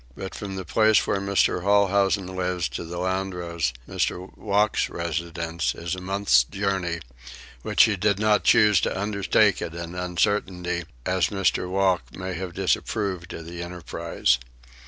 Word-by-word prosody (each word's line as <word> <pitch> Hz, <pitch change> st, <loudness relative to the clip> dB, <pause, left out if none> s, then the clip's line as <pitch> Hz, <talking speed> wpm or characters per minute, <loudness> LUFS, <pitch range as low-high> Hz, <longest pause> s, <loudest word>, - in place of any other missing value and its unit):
But 95 Hz, -, -6 dB
from 100 Hz, -2 st, -6 dB
the 95 Hz, -1 st, -5 dB
place 110 Hz, -1 st, +4 dB
where 100 Hz, -, 0 dB
Mr. 100 Hz, -2 st, +2 dB
Holhousen 100 Hz, 0 st, +3 dB
lives 90 Hz, -3 st, -1 dB
to 60 Hz, -, -5 dB
the 85 Hz, +1 st, -7 dB
Landros, 90 Hz, -5 st, -2 dB, 0.2 s
Mr. 90 Hz, +1 st, -2 dB
Wocke's 105 Hz, +1 st, +1 dB
residence, 85 Hz, 0 st, -3 dB
is 85 Hz, -1 st, -4 dB
a 90 Hz, -, -5 dB
month's 95 Hz, -9 st, +3 dB
journey, 95 Hz, +1 st, -2 dB, 0.6 s
which -, -, +4 dB
he 105 Hz, -, +3 dB
did 100 Hz, +1 st, +1 dB
not 105 Hz, 0 st, +2 dB
choose 105 Hz, -5 st, +5 dB
to -, -, -1 dB
undertake 100 Hz, 0 st, +2 dB
at 85 Hz, -1 st, -5 dB
an 85 Hz, 0 st, -6 dB
uncertainty, 90 Hz, -1 st, -1 dB, 0.2 s
as 95 Hz, -1 st, +2 dB
Mr. 95 Hz, -2 st, 0 dB
Wocke 90 Hz, -10 st, 0 dB
might 95 Hz, -1 st, -4 dB
have 90 Hz, -1 st, -6 dB
disapproved 95 Hz, -1 st, -1 dB
of 80 Hz, -, -7 dB
the 85 Hz, +1 st, -7 dB
enterprise. 85 Hz, -7 st, -1 dB
95 Hz, 150 wpm, -25 LUFS, 85-100 Hz, 0.6 s, choose